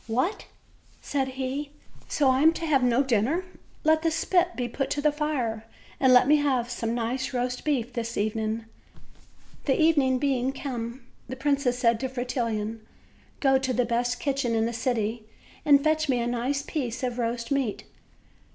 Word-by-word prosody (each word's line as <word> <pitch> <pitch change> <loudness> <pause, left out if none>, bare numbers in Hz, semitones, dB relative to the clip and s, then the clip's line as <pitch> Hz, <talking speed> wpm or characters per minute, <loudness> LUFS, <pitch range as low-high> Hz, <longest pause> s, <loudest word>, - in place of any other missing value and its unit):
"What!" 255 - -1 0.5
said 275 -2 -1
he, 275 +2 -3 0.3
"so 280 -3 +2
I 260 +1 +2
am 320 +2 +6
to 330 - -4
have 290 -4 +3
no 250 +2 +3
dinner! 265 - +1 0.4
Let 315 0 +4
the 330 - +2
spit 355 +2 +1
be 245 -1 -2
put 270 +3 -3
to 290 - -1
the 300 +1 +3
fire, 255 -8 -2 0.3
and 260 -1 +5
let 250 0 +6
me 300 +1 +6
have 260 -5 0
some 230 -1 -2
nice 250 +3 -2
roast 250 0 -2
meat 250 -5 0
this 230 -1 -4
evening." 220 +1 -1 1.0
The 270 - +2
evening 290 -5 +4
being 265 -1 0
come, 240 -2 -5 0.2
the 260 - -4
princess 275 -2 +1
said 230 -2 +2
to 260 - -2
Fretil 250 -1 -2
lon: 215 +1 -3 0.6
"Go 270 -2 +4
to 260 -1 -1
the 250 0 +1
best 245 +1 0
kitchen 270 -5 0
in 225 0 +2
the 235 - -2
city 225 -2 -1 0.4
and 285 -1 +6
fetch 310 -1 +1
me 250 -2 +2
a 235 - -1
nice 245 +4 -1
piece 255 -5 -3
of 250 -1 -2
roast 230 +1 -2
meat." 270 -7 -1
255 Hz, 180 wpm, -26 LUFS, 235-280 Hz, 1.0 s, am